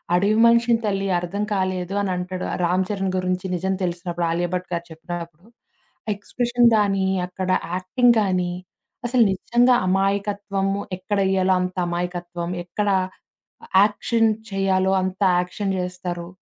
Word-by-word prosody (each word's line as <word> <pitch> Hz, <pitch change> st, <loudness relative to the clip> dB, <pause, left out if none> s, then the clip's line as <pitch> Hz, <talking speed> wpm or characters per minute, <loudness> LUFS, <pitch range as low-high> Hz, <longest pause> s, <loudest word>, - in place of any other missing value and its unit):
"అడవి 200 Hz, +4 st, +3 dB
మనిషిని 235 Hz, 0 st, +4 dB
తల్లి 195 Hz, -1 st, 0 dB
అర్థం 190 Hz, +4 st, -3 dB
కాలేదు" 185 Hz, -1 st, -1 dB
అని 195 Hz, -2 st, -1 dB
అంటాడు 180 Hz, 0 st, -4 dB, 0.2 s
'రామ్ 180 Hz, +2 st, +2 dB
చరణ్' 195 Hz, -2 st, -1 dB
గురించి 185 Hz, 0 st, -1 dB
నిజం 190 Hz, +2 st, -1 dB
తెలిసినప్పుడు 175 Hz, -1 st, -2 dB
'ఆలియభట్' 175 Hz, +1 st, -2 dB
గారు 170 Hz, 0 st, -3 dB
చెప్పినప్పుడు. 170 Hz, +1 st, -8 dB, 0.6 s
ఆ -, -, -2 dB
ఎక్స్‌ప్రెషన్స్ 240 Hz, +3 st, +2 dB
గానీ, 195 Hz, -2 st, +2 dB, 0.2 s
అక్కడ 185 Hz, +1 st, -5 dB, 0.3 s
యాక్టింగ్ 235 Hz, +7 st, +3 dB
గానీ, 185 Hz, -3 st, 0 dB, 0.6 s
అసలు 245 Hz, -1 st, +4 dB
నిజంగా 240 Hz, +6 st, +3 dB
అమాయకత్వము 200 Hz, 0 st, 0 dB, 0.2 s
ఎక్కడెయ్యాలో 190 Hz, -1 st, +1 dB
అంత 180 Hz, 0 st, -3 dB
అమాయకత్వం, 175 Hz, 0 st, -4 dB, 0.2 s
ఎక్కడ 205 Hz, +4 st, -1 dB, 0.9 s
యాక్షన్ 220 Hz, +2 st, +2 dB, 0.2 s
చేయాలో 190 Hz, -1 st, +1 dB
అంత 185 Hz, +1 st, -3 dB, 0.2 s
యాక్షన్ 190 Hz, +2 st, -3 dB
జేస్తారు. 180 Hz, -1 st, -4 dB
190 Hz, 120 wpm, -22 LUFS, 180-200 Hz, 0.9 s, మనిషిని